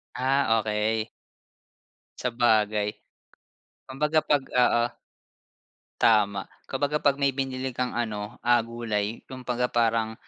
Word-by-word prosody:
Ah, 130 -3 +2
okey. 110 +1 -1 1.1
Sabagay. 110 -4 +1 0.9
Kumbaga 150 +4 -1
'pag 145 -2 +2
oo. 120 -1 +3 1.2
Tama. 100 -3 +3 0.2
Kumbaga 145 +2 -1
'pag 140 -1 +3
may 140 -1 +1
binili 130 -1 -3
kang 125 0 -2
ano, 110 -1 -3
ah, 120 0 +5
gulay 115 -2 -3
kumabaga 125 -1 -2
parang, 115 -2 +1
120 Hz, 100 wpm, -26 LUFS, 110-130 Hz, 1.2 s, ah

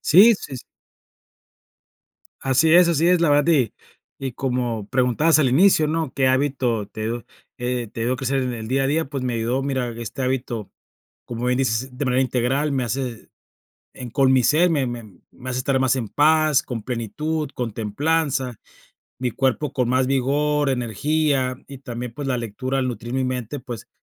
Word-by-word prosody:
Sí, 200 +8 +7
sí, 150 - -9
s 125 - -8 1.8
Así 135 +5 +3
es, 180 -1 +7
así 165 0 +2
es, 180 -1 +4
la 165 - +3
verdad. 145 +3 +4
Y 130 -7 +2 0.5
y 135 -2 -4
como 120 -5 -2
preguntabas 130 +6 +3
al 135 - +3
inicio, 155 +2 +4
¿no?: 160 -3 -1
"¿Qué 135 -1 +2
hábito 130 -5 0
te, 115 +3 -4 0.3
eh, 125 -1 -2
te - - -6
ayudó 120 +2 +1
a - - -5
crecer 135 +1 -1
en 125 -1 -2
el 110 -2 -6
día 135 +2 +1
a - - +2
día?". 160 +3 +1
Pues, 135 -3 -4
me 125 -2 -1
ayudó, 120 +4 -1
mira, 130 -3 -1
este 120 +3 -5
hábito, 125 -5 -2 0.6
como 120 0 -4
bien 125 0 +2
dices, 125 +1 -1
de 140 - -2
manera 125 +1 +2
integral, 130 +4 0
me 130 -2 0
hace 120 -1 -4 0.6
en 125 -2 -8
con 135 +1 +3
mi 130 - +5
ser, 160 +9 +4
me 140 -5 +1
me 120 -1 -5 0.3
me 130 0 -9
hace 125 0 -2
estar 130 +1 +1
más 130 0 +2
en 120 -4 -3
paz, 155 -1 +3
con 120 -3 -5
plenitud, 135 +7 -3
con 120 -3 -3
templanza, 130 +4 -1 0.6
mi 125 -1 -1
cuerpo 135 +3 0
con 125 -3 0
más 130 +1 +2
vigor, 145 +2 +1
energía 130 +2 0
y 140 -2 -10
también, 120 -3 -6
pues, 145 +1 -5
la 125 -2 0
lectura 120 +4 -3
al 130 -1 0
nutrir 120 0 -5
mi 130 0 0
mente, 125 +1 -3
pues, 120 -4 -8
130 Hz, 185 wpm, -22 LUFS, 120-145 Hz, 1.8 s, Sí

